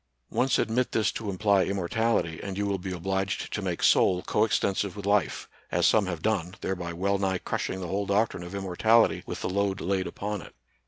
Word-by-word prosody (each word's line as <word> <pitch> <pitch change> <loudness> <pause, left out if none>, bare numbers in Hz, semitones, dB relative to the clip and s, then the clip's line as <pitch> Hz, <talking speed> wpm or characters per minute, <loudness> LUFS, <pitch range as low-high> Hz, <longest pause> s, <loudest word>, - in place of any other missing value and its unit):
Once 130 0 +2
admit 120 +2 0
this 110 -3 +2
to 110 - -5
imply 100 0 +3
immortality 100 -2 0
and 95 -1 -5
you 100 - 0
will 100 -1 -1
be 95 +1 -5
obliged 95 +1 -2
to - - -2
make - - -3
soul 90 -1 +4
coextensive 100 -2 +1
with 100 -1 -7
life, 100 -4 +1 0.2
as - - +2
some 105 -4 +4
have 85 -3 -4
done, 95 -4 0
thereby 90 -3 -3
well 100 +4 0
nigh 95 -1 +1
crushing 95 - -3
the 90 - -4
whole 100 +2 -2
doc 105 +3 +3
trine - - -8
of 90 +2 -7
immortality 100 +4 +3
with - - -5
the - - 0
load 100 0 0
laid 95 -1 -1
upon 105 -1 -4
it. - - -13
100 Hz, 205 wpm, -27 LUFS, 95-105 Hz, 0.2 s, soul